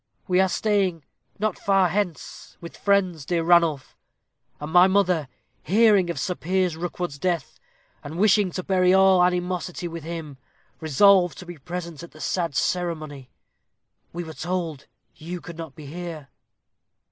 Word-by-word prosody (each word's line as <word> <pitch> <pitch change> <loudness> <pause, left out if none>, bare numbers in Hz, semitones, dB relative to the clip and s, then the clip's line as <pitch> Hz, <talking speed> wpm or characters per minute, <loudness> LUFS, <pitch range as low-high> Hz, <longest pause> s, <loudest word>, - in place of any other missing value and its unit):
"We 180 0 +2
are 190 - +2
staying 190 -7 0 0.3
not 215 -1 -2
far 195 -2 +3
hence, 185 -2 -4
with 170 - -10
friends, 185 -6 +1
dear 165 +3 -1
Ranulph; 165 -5 +2 0.6
and 150 +1 -6
my 180 +1 +7
mother, 185 -6 +1 0.3
hearing 205 - +4
of 170 - -3
Sir 190 -4 -1
Piers 180 0 -1
Rookwood's 175 -3 -5
death, 175 +1 -2 0.4
and 155 +3 -7
wishing 205 0 +4
to 185 - -4
bury 185 -1 +3
all 190 -1 +5
animosity 180 0 -1
with 165 -2 -7
him, 160 -4 -7 0.4
resolved 175 +3 +4
to 180 - -9
be 175 -3 -10
present 170 +1 -6
at 170 - -12
the 155 - -15
sad 165 -3 -2
ceremony. 155 -7 -2 0.8
We 175 +1 -5
were 160 -1 -9
told 165 -4 -4 0.3
you 175 +3 -6
could 170 -1 -11
not 160 -5 -8
be 155 - -11
here." 160 -2 -7
175 Hz, 150 wpm, -24 LUFS, 160-185 Hz, 0.8 s, my